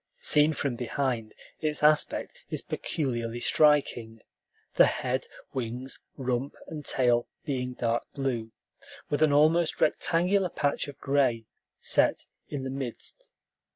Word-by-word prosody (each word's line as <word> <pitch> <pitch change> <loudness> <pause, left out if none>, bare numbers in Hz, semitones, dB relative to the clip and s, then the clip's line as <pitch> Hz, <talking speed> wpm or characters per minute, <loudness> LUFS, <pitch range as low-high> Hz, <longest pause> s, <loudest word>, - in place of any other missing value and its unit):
Seen 150 +1 +4
from 140 -4 -2
behind, 120 -3 -2 0.2
its 150 -1 -2
aspect 150 0 +2
is - - -2
peculiarly 120 -5 -2
striking; 120 -6 +2 0.5
the - - +6
head, 130 +1 -2 0.3
wings, 125 +1 -4 0.2
rump, 130 0 -2
and 150 -2 -7
tail 120 -3 +2 0.2
being 125 -3 -2
dark 120 -1 -1
blue, 125 -5 -2 0.6
with 145 - 0
an 155 -2 +5
almost 155 +3 +4
rectangular 180 +3 +2
patch 145 -3 -1
of 145 - -9
gray 130 -5 +1 0.3
set - - +2 0.2
in 140 -3 -4
the 130 - -3
midst. 135 - -6
135 Hz, 120 wpm, -28 LUFS, 120-150 Hz, 0.6 s, the